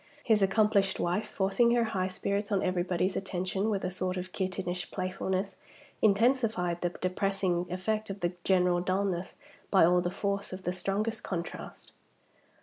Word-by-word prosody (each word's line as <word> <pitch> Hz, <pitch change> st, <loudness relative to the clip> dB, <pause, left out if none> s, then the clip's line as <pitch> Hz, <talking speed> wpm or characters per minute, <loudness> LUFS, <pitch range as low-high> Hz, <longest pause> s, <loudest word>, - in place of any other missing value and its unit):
His 220 Hz, -3 st, +3 dB
accomplished 200 Hz, 0 st, +3 dB
wife, 185 Hz, +5 st, 0 dB
forcing 200 Hz, +5 st, +2 dB
her 240 Hz, -, +3 dB
high 195 Hz, -5 st, -1 dB
spirits 200 Hz, +2 st, -2 dB
on 195 Hz, -2 st, +2 dB
everybody's 180 Hz, +1 st, 0 dB
attention 190 Hz, +2 st, -1 dB
with 200 Hz, -3 st, -1 dB
a 180 Hz, -, -1 dB
sort 185 Hz, 0 st, -2 dB
of 180 Hz, 0 st, -5 dB
kittenish 185 Hz, -2 st, -3 dB
playfulness, 190 Hz, +1 st, -2 dB, 0.4 s
intensified 215 Hz, -5 st, +2 dB
the 175 Hz, -, +1 dB
depressing 185 Hz, 0 st, -1 dB
effect 215 Hz, +4 st, -2 dB
of 195 Hz, 0 st, -6 dB
the 175 Hz, +1 st, 0 dB
general 180 Hz, -2 st, +3 dB
dullness 185 Hz, -1 st, -1 dB, 0.3 s
by 190 Hz, -4 st, +6 dB
all 180 Hz, +1 st, +4 dB
the 175 Hz, -, -1 dB
force 200 Hz, +1 st, -2 dB
of 185 Hz, 0 st, -7 dB
the 180 Hz, -, -1 dB
strongest 195 Hz, +5 st, -1 dB
contrast. 175 Hz, -2 st, -6 dB
190 Hz, 150 wpm, -30 LUFS, 180-200 Hz, 0.4 s, by